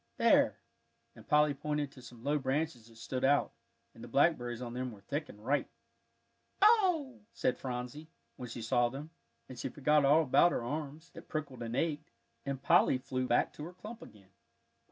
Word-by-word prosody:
There," -, -, +4 dB, 0.6 s
and -, -, -15 dB
Polly 150 Hz, -1 st, +4 dB
pointed 150 Hz, 0 st, -2 dB
to 130 Hz, -, -14 dB
some 120 Hz, -1 st, -13 dB
low 145 Hz, +2 st, +1 dB
branches 135 Hz, -3 st, -2 dB
that 115 Hz, -, -18 dB
stood 115 Hz, +3 st, -4 dB
out; 140 Hz, +2 st, +3 dB, 0.4 s
and 115 Hz, -, -13 dB
the -, -, -8 dB
blackberries 120 Hz, -3 st, +2 dB
on 120 Hz, -2 st, -6 dB
them 125 Hz, 0 st, -3 dB
were 105 Hz, -3 st, -13 dB
thick 145 Hz, +9 st, -4 dB
and 105 Hz, +1 st, -13 dB
ripe. 145 Hz, +3 st, +1 dB, 1.0 s
"Ooh!" 360 Hz, -, +3 dB
said 125 Hz, -, 0 dB
Phronsie, 125 Hz, +4 st, -5 dB, 0.3 s
when 125 Hz, -1 st, -7 dB
she 115 Hz, -1 st, -6 dB
saw 120 Hz, +1 st, +2 dB
them; 145 Hz, +5 st, -8 dB, 0.4 s
and 130 Hz, -2 st, -10 dB
she -, -, -3 dB
forgot 150 Hz, +1 st, +2 dB
all 150 Hz, +4 st, +5 dB
about 165 Hz, +5 st, +4 dB
her -, -, -2 dB
arms, 150 Hz, +4 st, -5 dB
that 165 Hz, -, -12 dB
prickled 150 Hz, -5 st, -5 dB
and 115 Hz, 0 st, -4 dB
ached, 150 Hz, 0 st, -1 dB, 0.4 s
and 135 Hz, -1 st, -3 dB
Polly 135 Hz, -, +5 dB
flew 130 Hz, 0 st, -3 dB
back 120 Hz, -, +2 dB
to 150 Hz, -, -8 dB
her 175 Hz, -, -9 dB
clump 215 Hz, +6 st, -10 dB
again. 100 Hz, -2 st, -15 dB
135 Hz, 185 wpm, -32 LUFS, 120-150 Hz, 1.0 s, all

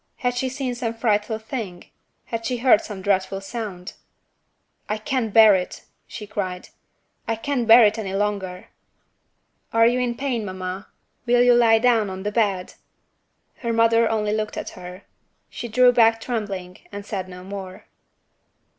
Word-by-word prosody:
Had 245 Hz, -1 st, -1 dB
she 260 Hz, +1 st, -1 dB
seen 260 Hz, -1 st, -3 dB
some 235 Hz, -2 st, -4 dB
frightful 220 Hz, -1 st, 0 dB
thing? 220 Hz, -6 st, -6 dB, 0.4 s
had 230 Hz, -1 st, -5 dB
she 250 Hz, +1 st, -2 dB
heard 240 Hz, -3 st, +4 dB
some 195 Hz, -3 st, -8 dB
dreadful 195 Hz, 0 st, 0 dB
sound? 195 Hz, -3 st, -7 dB, 1.0 s
"I 210 Hz, -, -1 dB
can't 225 Hz, 0 st, -2 dB
bear 220 Hz, -1 st, +7 dB
it!" 180 Hz, -1 st, -3 dB, 0.2 s
she 210 Hz, -, -8 dB
cried 185 Hz, -3 st, -5 dB, 0.6 s
"I 225 Hz, -, 0 dB
can't 245 Hz, 0 st, -2 dB
bear 230 Hz, 0 st, +9 dB
it 215 Hz, +2 st, +1 dB
any 195 Hz, -3 st, -4 dB
longer!" 195 Hz, -3 st, -3 dB, 1.0 s
"Are 230 Hz, 0 st, +4 dB
you 245 Hz, +2 st, +3 dB
in 245 Hz, -1 st, -1 dB
pain, 250 Hz, -4 st, -2 dB
mamma? 185 Hz, 0 st, -6 dB, 0.4 s
Will 245 Hz, 0 st, +4 dB
you 245 Hz, 0 st, +6 dB
lie 230 Hz, -2 st, +5 dB
down 225 Hz, -3 st, +2 dB
on 190 Hz, 0 st, -7 dB
the 210 Hz, -, -2 dB
bed?" 200 Hz, -5 st, 0 dB, 0.8 s
Her 235 Hz, -2 st, -3 dB
mother 230 Hz, 0 st, +3 dB
only 210 Hz, -1 st, 0 dB
looked 215 Hz, 0 st, -3 dB
at -, -, -5 dB
her. 180 Hz, +1 st, -10 dB, 0.5 s
She 240 Hz, -, -6 dB
drew 250 Hz, +2 st, +5 dB
back 225 Hz, -2 st, +4 dB
trembling, 200 Hz, -6 st, -5 dB
and 205 Hz, 0 st, -7 dB
said 190 Hz, -3 st, -5 dB
no 180 Hz, 0 st, -10 dB
more. 190 Hz, -1 st, -8 dB
220 Hz, 160 wpm, -23 LUFS, 195-235 Hz, 1.0 s, bear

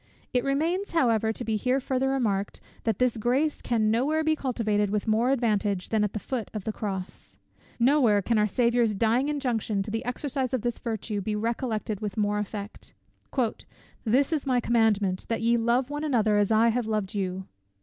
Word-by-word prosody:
It 250 Hz, -1 st, +2 dB
remains, 330 Hz, +9 st, 0 dB
however 230 Hz, -8 st, +2 dB
to 235 Hz, -, -5 dB
be 220 Hz, -1 st, 0 dB
here 255 Hz, +5 st, +1 dB
farther 265 Hz, 0 st, 0 dB
remarked, 210 Hz, -7 st, -1 dB, 0.3 s
that 225 Hz, -4 st, +1 dB
this 250 Hz, -2 st, +1 dB
grace 260 Hz, +7 st, 0 dB
can 220 Hz, -3 st, +1 dB
no 230 Hz, +3 st, +2 dB
where 315 Hz, +3 st, +1 dB
be 315 Hz, 0 st, +2 dB
cultivated 215 Hz, -7 st, 0 dB
with 210 Hz, 0 st, -1 dB
more 225 Hz, +3 st, +2 dB
advantage 210 Hz, -7 st, 0 dB
than 220 Hz, -2 st, +2 dB
at 210 Hz, -, -1 dB
the 215 Hz, -, -3 dB
foot 240 Hz, 0 st, -4 dB
of 210 Hz, -, -3 dB
the 220 Hz, -, -3 dB
cross. 195 Hz, -4 st, -6 dB, 0.4 s
No 275 Hz, +5 st, +4 dB
where 210 Hz, -5 st, +4 dB
can 230 Hz, +1 st, +2 dB
our 210 Hz, -, +3 dB
Saviour's 235 Hz, 0 st, +2 dB
dying 230 Hz, +7 st, +2 dB
injunction 235 Hz, -8 st, -1 dB
to 210 Hz, -, -6 dB
the 225 Hz, +2 st, -2 dB
exercise 260 Hz, +1 st, -2 dB
of 245 Hz, -, -3 dB
this 240 Hz, -1 st, -2 dB
virtue 220 Hz, -2 st, -3 dB
be 210 Hz, +2 st, -2 dB
recollected 220 Hz, -1 st, -2 dB
with 210 Hz, 0 st, -5 dB
more 210 Hz, 0 st, +1 dB
effect; 210 Hz, 0 st, -7 dB, 1.1 s
"This 260 Hz, +7 st, +2 dB
is 295 Hz, -3 st, -2 dB
my 250 Hz, -2 st, +3 dB
commandment, 215 Hz, -6 st, +1 dB
that 230 Hz, -, -1 dB
ye 235 Hz, +1 st, +4 dB
love 240 Hz, +3 st, +1 dB
one 295 Hz, +1 st, -3 dB
another 225 Hz, -8 st, +2 dB
as 205 Hz, +1 st, +2 dB
I 225 Hz, +1 st, +5 dB
have 235 Hz, 0 st, -1 dB
loved 215 Hz, -3 st, -2 dB
you." 190 Hz, -2 st, -3 dB
230 Hz, 195 wpm, -27 LUFS, 210-255 Hz, 1.1 s, I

